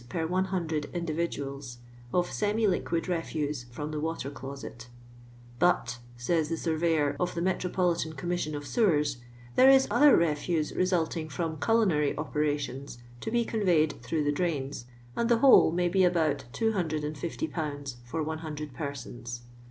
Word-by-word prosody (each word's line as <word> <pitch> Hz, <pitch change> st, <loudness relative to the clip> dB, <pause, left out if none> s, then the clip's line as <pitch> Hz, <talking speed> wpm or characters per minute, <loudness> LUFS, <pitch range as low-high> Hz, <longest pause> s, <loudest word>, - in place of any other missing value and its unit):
per 165 Hz, +2 st, -2 dB
100 175 Hz, -4 st, -1 dB
individuals, 145 Hz, -6 st, -3 dB, 0.3 s
of 175 Hz, 0 st, +1 dB
semi 215 Hz, +2 st, +1 dB
liqnid 175 Hz, -3 st, 0 dB
refuse 150 Hz, -6 st, -2 dB
from 145 Hz, +5 st, -6 dB
the 155 Hz, -, -3 dB
water 160 Hz, -3 st, -3 dB
closet 135 Hz, -3 st, -8 dB, 0.7 s
"But," 125 Hz, -9 st, +2 dB, 0.2 s
says 155 Hz, +6 st, 0 dB
the 165 Hz, -, -1 dB
Surveyor 160 Hz, -2 st, +1 dB
of 180 Hz, -1 st, -1 dB
the 170 Hz, -, -1 dB
Me 190 Hz, -, +3 dB
tropolitan 175 Hz, -4 st, -1 dB
Commission 175 Hz, -1 st, -2 dB
of 145 Hz, 0 st, -5 dB
Sewers, 150 Hz, -, +2 dB, 0.2 s
" 120 Hz, 0 st, -20 dB
there 260 Hz, +1 st, +7 dB
is 270 Hz, 0 st, +6 dB
other 290 Hz, -1 st, +7 dB
refuse 155 Hz, 0 st, 0 dB
resulting 170 Hz, -3 st, 0 dB
from 160 Hz, 0 st, -3 dB
culinary 170 Hz, -7 st, +2 dB
operations, 145 Hz, -3 st, -2 dB, 0.2 s
to -, -, -4 dB
be 235 Hz, +1 st, +1 dB
conveyed 175 Hz, -, +1 dB
through 150 Hz, +5 st, -1 dB
the 145 Hz, -, +2 dB
drains, 145 Hz, -6 st, -2 dB, 0.3 s
and 235 Hz, -, 0 dB
the 235 Hz, -, +5 dB
whole 260 Hz, -8 st, +7 dB
may 175 Hz, +1 st, +1 dB
be 190 Hz, +2 st, +3 dB
about 160 Hz, -6 st, +2 dB
250 165 Hz, -, -1 dB
lbs. 145 Hz, -5 st, -4 dB
for 155 Hz, +7 st, -3 dB
100 155 Hz, -2 st, -5 dB
persons.'' 120 Hz, -4 st, -6 dB
160 Hz, 145 wpm, -29 LUFS, 145-180 Hz, 0.7 s, there